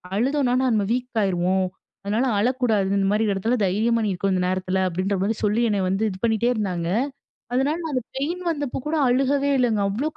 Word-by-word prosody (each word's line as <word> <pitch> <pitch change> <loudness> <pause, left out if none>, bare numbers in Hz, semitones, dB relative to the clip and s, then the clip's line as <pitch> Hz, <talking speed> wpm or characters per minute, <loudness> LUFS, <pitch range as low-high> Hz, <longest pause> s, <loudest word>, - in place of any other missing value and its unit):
அழுதோம்னா, 255 +3 +1
நம்ம 215 -4 +1
வீக் 250 -2 -2
ஆகிருவோம். 185 0 +1 0.4
அதனால 220 +6 +1
அழக்கூடாது. 235 -4 +1
இந்த 195 0 +1
மாரி 210 +2 +2
இடத்தில 210 +5 0
தைரியமா 225 +5 +1
நீ 205 - 0
இருக்கணு, 195 +2 -1
இந்த 180 - 0
நேரத்தில." 185 0 -1
அப்டின்ற 185 +3 -1
மாரி 215 +3 0
சொல்லி, 210 +2 +2
என்ன 205 -2 0
வந்து 195 +3 0
இது 185 -2 -7
பண்ணிட்டே 230 +1 +1
இருந்தாங்க. 185 -6 -2 0.7
அதனால, 270 +4 +1
நான் 320 - -3
அந்த 255 -3 -1
பெயின் 335 +6 -2
வந்தபோ 290 -5 -2
கூட 320 - 0
அழுகவே 275 +3 +2
இல்லைங்க. 225 -5 +2
அவ்வளவு 265 +11 -2
220 Hz, 185 wpm, -23 LUFS, 195-255 Hz, 0.7 s, மாரி